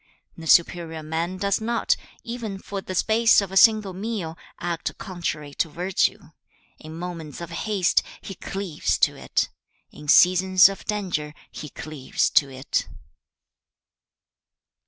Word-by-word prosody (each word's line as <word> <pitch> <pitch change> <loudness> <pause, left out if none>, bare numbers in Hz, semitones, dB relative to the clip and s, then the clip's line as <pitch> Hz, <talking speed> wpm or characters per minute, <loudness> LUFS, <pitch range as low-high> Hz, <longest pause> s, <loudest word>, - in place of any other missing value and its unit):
3. - - -12
'The 160 - -7
superior 165 -1 +3
man 165 +4 -3
does 200 +2 0
not, 235 +1 +1 0.3
even 230 -4 -5
for 195 0 -6
the 185 - -6
space 225 +4 +4
of 200 -2 -3
a - - -6
single 215 -1 +5
meal, 190 -4 -4 0.2
act 170 -1 -3
contrary 155 -5 -5
to 165 - -1
virtue. 180 +5 -1 0.5
In 155 +1 -10
moments 165 -5 -6
of 170 -2 -7
haste, 200 -5 +1 0.2
he 195 - -8
cleaves 190 -3 -2
to - - +3
it. - - -1 0.4
In 150 - -12
seasons 185 +4 +6
of 195 - -8
danger, 175 -8 -3 0.2
he 150 - -8
cleaves 150 -3 -2
to 140 - +4
it.' 130 +1 -2
180 Hz, 135 wpm, -24 LUFS, 160-200 Hz, 0.5 s, seasons